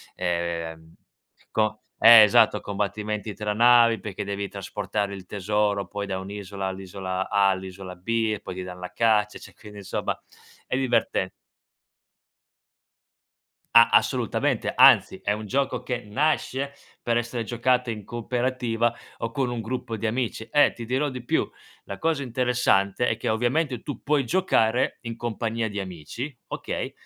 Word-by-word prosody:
ehm, 85 Hz, -2 st, -3 dB, 0.5 s
i -, -, -26 dB
co 110 Hz, 0 st, 0 dB, 0.2 s
eh, 115 Hz, -1 st, +10 dB
esatto 110 Hz, -1 st, +5 dB
combattimenti 105 Hz, +1 st, -3 dB
tra 105 Hz, 0 st, -2 dB
navi, 120 Hz, 0 st, +5 dB
perché 105 Hz, +1 st, -5 dB
devi 100 Hz, 0 st, -3 dB
trasportare 100 Hz, 0 st, -3 dB
il 95 Hz, -1 st, -10 dB
tesoro, 105 Hz, +1 st, -1 dB
poi 100 Hz, -1 st, -4 dB
da 95 Hz, -1 st, -3 dB
un'isola, 100 Hz, 0 st, -5 dB
all'isola 95 Hz, 0 st, -4 dB
A, 100 Hz, -1 st, +3 dB
all'isola 95 Hz, -1 st, -5 dB
B 115 Hz, +5 st, -1 dB
e -, -, -9 dB
poi -, -, -7 dB
ti 95 Hz, -, -6 dB
danno 90 Hz, 0 st, -8 dB
la 90 Hz, -, -6 dB
caccia, 105 Hz, -1 st, +2 dB
cioè -, -, -14 dB
quindi 105 Hz, -2 st, -12 dB
insomma 100 Hz, -, -3 dB, 0.5 s
è 130 Hz, -, -1 dB
diverten 130 Hz, -2 st, +1 dB, 2.5 s
A 115 Hz, 0 st, +9 dB
assolutamente, -, -, +1 dB
anzi -, -, +6 dB
è 105 Hz, -, +1 dB
un 105 Hz, +1 st, -5 dB
gioco 135 Hz, +5 st, -1 dB
che 125 Hz, -2 st, -3 dB
nasce 140 Hz, +3 st, -1 dB, 0.3 s
per 120 Hz, -1 st, +1 dB
essere 120 Hz, 0 st, -2 dB
giocato 125 Hz, +2 st, +1 dB
in 105 Hz, -3 st, -7 dB
cooperativa 120 Hz, 0 st, -1 dB, 0.2 s
o 115 Hz, 0 st, -4 dB
con 135 Hz, -2 st, -1 dB
un 120 Hz, -1 st, -3 dB
gruppo 115 Hz, 0 st, -4 dB
di 110 Hz, -, -2 dB
amici. 115 Hz, -1 st, -2 dB
Eh 145 Hz, 0 st, +5 dB
ti 120 Hz, -, -8 dB
dirò 130 Hz, +5 st, 0 dB
di 125 Hz, -2 st, -7 dB
più, -, -, +1 dB, 0.4 s
la 100 Hz, -, -8 dB
cosa 160 Hz, -3 st, 0 dB
interessante 125 Hz, -4 st, +1 dB
è 115 Hz, -, 0 dB
che -, -, -2 dB
ovviamente 125 Hz, +4 st, 0 dB
tu 145 Hz, -, -6 dB
puoi 145 Hz, -2 st, +1 dB
giocare 125 Hz, -7 st, +1 dB
in 115 Hz, -1 st, -6 dB
compagnia 115 Hz, -1 st, -2 dB
di 100 Hz, 0 st, -4 dB
amici, 95 Hz, -, -6 dB
okay, -, -, -4 dB
110 Hz, 155 wpm, -25 LUFS, 100-120 Hz, 2.5 s, eh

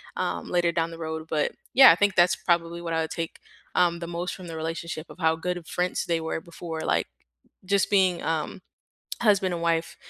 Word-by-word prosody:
um, -, -, -3 dB
later 175 Hz, -1 st, +2 dB
down 165 Hz, 0 st, 0 dB
the 165 Hz, -, -9 dB
road, 160 Hz, -1 st, -5 dB
but, 150 Hz, -2 st, +1 dB, 0.2 s
yeah, 265 Hz, +1 st, +10 dB
I -, -, +4 dB
think 205 Hz, +2 st, +2 dB
that's 175 Hz, 0 st, +5 dB
probably 170 Hz, -1 st, 0 dB
what 170 Hz, -1 st, -4 dB
I 160 Hz, -, +1 dB
would 160 Hz, -, -3 dB
take, 165 Hz, -1 st, -4 dB, 0.4 s
um, 175 Hz, -1 st, +3 dB
the 170 Hz, -, -5 dB
most 175 Hz, +1 st, -3 dB
from 185 Hz, -2 st, -9 dB
the 165 Hz, -, -6 dB
relationship, 165 Hz, 0 st, -5 dB
of -, -, -14 dB
how 160 Hz, -2 st, +3 dB
good 180 Hz, +2 st, -3 dB
of 170 Hz, -, -10 dB
friends 180 Hz, +1 st, -1 dB
they 170 Hz, -1 st, 0 dB
were 160 Hz, 0 st, -3 dB
before, 165 Hz, -1 st, -7 dB
like, -, -, +1 dB, 0.6 s
just 200 Hz, +1 st, +2 dB
being, 185 Hz, -3 st, +3 dB
um, 160 Hz, +4 st, -2 dB, 0.6 s
husband 195 Hz, -5 st, +3 dB
and 170 Hz, -, -4 dB
wife. 165 Hz, -1 st, 0 dB
170 Hz, 215 wpm, -26 LUFS, 165-180 Hz, 0.6 s, yeah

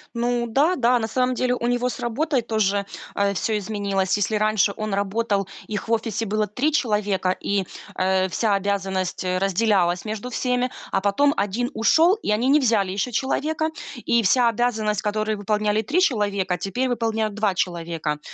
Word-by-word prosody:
Ну 240 Hz, 0 st, 0 dB
да, 285 Hz, +10 st, +2 dB
да. 245 Hz, -3 st, +3 dB
На 220 Hz, -, -2 dB
самом 255 Hz, +2 st, 0 dB
деле 250 Hz, 0 st, +1 dB
у 240 Hz, -, -2 dB
него 245 Hz, +1 st, +1 dB
с -, -, -6 dB
работой 270 Hz, +3 st, 0 dB
тоже, 205 Hz, -3 st, 0 dB, 0.3 s
э, 200 Hz, 0 st, +1 dB
всё 215 Hz, +4 st, -1 dB
изменилось. 200 Hz, -2 st, -1 dB
Если 205 Hz, +2 st, 0 dB
раньше 215 Hz, -1 st, +2 dB
он 215 Hz, -2 st, -3 dB
работал, 200 Hz, 0 st, 0 dB, 0.2 s
их 210 Hz, 0 st, -4 dB
в -, -, -4 dB
офисе 225 Hz, -1 st, 0 dB
было 215 Hz, 0 st, 0 dB
3 250 Hz, +10 st, 0 dB
человека, 210 Hz, -8 st, +1 dB
и, 195 Hz, +1 st, -1 dB, 0.3 s
э, 185 Hz, 0 st, +1 dB
вся 205 Hz, +3 st, +1 dB
обязанность, 190 Hz, -2 st, -2 dB
э, 185 Hz, 0 st, 0 dB
разделялась 195 Hz, -2 st, +1 dB
между 220 Hz, +3 st, -4 dB
всеми. 250 Hz, +1 st, -1 dB, 0.2 s
А 195 Hz, -, +1 dB
потом 245 Hz, +9 st, +2 dB
1 210 Hz, +5 st, -1 dB
ушел, 320 Hz, -, +4 dB
и 435 Hz, -, -3 dB
они 220 Hz, +4 st, +1 dB
не 285 Hz, +3 st, +5 dB
взяли 220 Hz, -8 st, +2 dB
еще 200 Hz, +6 st, -2 dB
человека. 305 Hz, +6 st, -1 dB, 0.4 s
И 235 Hz, -1 st, +3 dB
вся 235 Hz, +4 st, +4 dB
обязанность, 220 Hz, -3 st, 0 dB
которую 215 Hz, 0 st, -1 dB
выполняли 210 Hz, +1 st, 0 dB
3 300 Hz, -, 0 dB
человека, 200 Hz, -, +1 dB
теперь 245 Hz, +9 st, -2 dB
выполняют 225 Hz, -3 st, -1 dB
2 215 Hz, -2 st, +1 dB
человека. 165 Hz, -4 st, -2 dB
215 Hz, 175 wpm, -23 LUFS, 200-245 Hz, 0.4 s, не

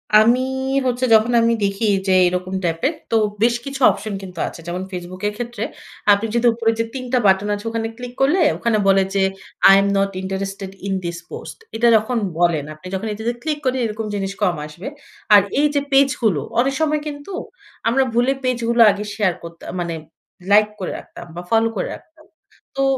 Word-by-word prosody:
আমি 230 Hz, +4 st, +6 dB, 0.5 s
হচ্ছে 250 Hz, +1 st, 0 dB
যখন 220 Hz, +2 st, +5 dB
আমি 230 Hz, 0 st, +3 dB
দেখি 200 Hz, +3 st, 0 dB, 0.2 s
যে 190 Hz, -, +4 dB
এরকম 180 Hz, +1 st, -2 dB
টাইপের, 170 Hz, -, 0 dB, 0.2 s
তো -, -, +2 dB, 0.3 s
বেশ 235 Hz, 0 st, +4 dB
কিছু 275 Hz, 0 st, -6 dB
অপশন 215 Hz, -1 st, -6 dB
কিন্তু 185 Hz, -3 st, -9 dB
আছে। -, -, -9 dB
যেমন 175 Hz, +1 st, -3 dB
Facebook 180 Hz, 0 st, -7 dB
এর 210 Hz, -, -2 dB
ক্ষেত্রে 240 Hz, -2 st, -4 dB, 0.5 s
আপনি 205 Hz, +2 st, +3 dB
যদি 240 Hz, +1 st, +3 dB
উপরে 230 Hz, -1 st, +1 dB
যে -, -, +3 dB
৩ 260 Hz, -2 st, -5 dB
টা -, -, +5 dB
বাটন 190 Hz, +1 st, +3 dB
আছে, 205 Hz, +2 st, -9 dB
ওখানে 225 Hz, 0 st, -2 dB
ক্লিক 245 Hz, -1 st, -7 dB
করলে 295 Hz, +8 st, +3 dB, 0.2 s
ওখানে 230 Hz, -2 st, +1 dB
বলে 195 Hz, 0 st, +5 dB
যে, 195 Hz, -, +3 dB, 0.5 s
I -, -, +9 dB
am 200 Hz, -, +1 dB
not 195 Hz, 0 st, +2 dB
interested 195 Hz, +1 st, -4 dB, 0.2 s
in 195 Hz, -, -1 dB
this 170 Hz, 0 st, -4 dB
post। -, -, -8 dB, 0.2 s
এটা 235 Hz, +2 st, +3 dB
যখন 220 Hz, +3 st, -1 dB, 0.2 s
বলেন 170 Hz, -4 st, +2 dB
আপনি 155 Hz, +4 st, -12 dB
যখন 200 Hz, +4 st, -3 dB
এটাতে 220 Hz, +3 st, -2 dB
ক্লিক 305 Hz, -1 st, -1 dB
করি, 260 Hz, 0 st, +1 dB
এরকম 220 Hz, 0 st, -4 dB
জিনিস 195 Hz, -1 st, -2 dB
কম 180 Hz, -3 st, +2 dB
আসবে। 160 Hz, -, -9 dB, 0.5 s
আর 205 Hz, -, +9 dB, 0.2 s
এইযে 290 Hz, -1 st, +2 dB
পেজগুলো 255 Hz, -, +3 dB, 0.2 s
অনেক 270 Hz, +3 st, +2 dB
সময় 305 Hz, -1 st, +1 dB
কিন্তু 290 Hz, +5 st, -7 dB, 0.5 s
আমরা 260 Hz, +4 st, +3 dB
ভুলে 245 Hz, +3 st, +3 dB
পেজগুলো 235 Hz, -2 st, +1 dB
আগে 200 Hz, +1 st, -4 dB
শেয়ার 200 Hz, -5 st, +1 dB
করতা 170 Hz, 0 st, -10 dB
মানে 170 Hz, -1 st, -2 dB, 0.6 s
লাইক 210 Hz, +1 st, +6 dB
করে 185 Hz, -, -3 dB
রাখতাম -, -, -12 dB
বা, 175 Hz, -, -5 dB
ফলো 225 Hz, 0 st, +3 dB
করে -, -, -2 dB
রাখতাম। 315 Hz, -1 st, -19 dB, 0.5 s
তো 275 Hz, -, +2 dB
220 Hz, 190 wpm, -20 LUFS, 190-245 Hz, 0.6 s, I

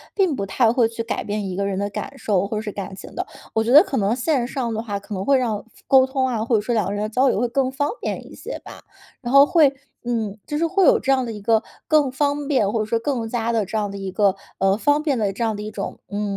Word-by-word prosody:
并 375 Hz, -7 st, +2 dB
不 200 Hz, -, -3 dB
太 225 Hz, +4 st, +2 dB
会 240 Hz, -2 st, +3 dB
去 230 Hz, 0 st, -5 dB
改 230 Hz, -, -3 dB
变 205 Hz, -1 st, -3 dB
一 185 Hz, -, -4 dB
个 200 Hz, +1 st, -1 dB
人 195 Hz, -1 st, -2 dB
的 200 Hz, +1 st, -1 dB
感 275 Hz, -, -6 dB
受 200 Hz, -6 st, 0 dB
或 215 Hz, -, -3 dB
者 -, -, -2 dB
是 215 Hz, -1 st, -5 dB
感 195 Hz, -1 st, -6 dB
情 -, -, -11 dB
的。 -, -, -2 dB, 0.3 s
我 220 Hz, -, +2 dB
觉 230 Hz, -, -1 dB
得 295 Hz, +5 st, +9 dB
可 275 Hz, -, -3 dB
能 210 Hz, +2 st, +1 dB
线 255 Hz, -1 st, 0 dB
上 245 Hz, -3 st, -3 dB
的 220 Hz, -, -2 dB
话， 205 Hz, -3 st, -4 dB
可 205 Hz, +2 st, -9 dB
能 190 Hz, -1 st, -3 dB
会 275 Hz, +5 st, +4 dB
让 230 Hz, -5 st, -1 dB
复 -, -, -28 dB, 0.2 s
沟 265 Hz, -1 st, +6 dB
通 265 Hz, -1 st, 0 dB
啊， 230 Hz, -4 st, -1 dB
或 235 Hz, +1 st, +1 dB
者 210 Hz, -, +2 dB
说 240 Hz, +3 st, -2 dB
两 215 Hz, -5 st, +1 dB
个 200 Hz, -, -2 dB
人 205 Hz, +1 st, -2 dB
的 215 Hz, -, -2 dB
交 255 Hz, +4 st, +3 dB
流 205 Hz, -, 0 dB
会 245 Hz, -, +1 dB
更 260 Hz, +2 st, 0 dB
方 285 Hz, +2 st, -1 dB
便 -, -, -4 dB
一 -, -, -13 dB
些 -, -, -7 dB
吧。 -, -, -11 dB, 0.4 s
然 240 Hz, -, -4 dB
后 275 Hz, 0 st, +9 dB
会， 305 Hz, -4 st, +4 dB, 0.3 s
嗯， 225 Hz, -4 st, -2 dB
就 295 Hz, -, -2 dB
是 330 Hz, -, +1 dB
会 375 Hz, +3 st, +2 dB
有 -, -, +6 dB
这 270 Hz, -, 0 dB
样 260 Hz, -2 st, +2 dB
的 230 Hz, -, -4 dB
一 210 Hz, -2 st, -8 dB
个 220 Hz, +1 st, +3 dB, 0.3 s
更 300 Hz, -4 st, +3 dB
方 285 Hz, +1 st, -1 dB
便， 255 Hz, -9 st, +2 dB
或 225 Hz, -, -1 dB
者 215 Hz, -, 0 dB
说 230 Hz, +2 st, 0 dB
更 235 Hz, -2 st, -2 dB
加 235 Hz, 0 st, -1 dB
地 225 Hz, -3 st, +1 dB
这 205 Hz, +4 st, -3 dB
样 205 Hz, -2 st, -1 dB
的 200 Hz, -, -7 dB
一 195 Hz, -1 st, -5 dB
个， 200 Hz, 0 st, +2 dB, 0.2 s
呃， 195 Hz, +1 st, +2 dB
方 290 Hz, +6 st, +2 dB
便 290 Hz, -5 st, +1 dB
的 205 Hz, -2 st, +1 dB
这 235 Hz, -, -3 dB
样 220 Hz, -1 st, -1 dB
的 205 Hz, -, -6 dB
一 210 Hz, -, -5 dB
种， 200 Hz, -, -5 dB
嗯， 205 Hz, -1 st, -2 dB
230 Hz, 325 characters per minute, -22 LUFS, 205-265 Hz, 0.4 s, 得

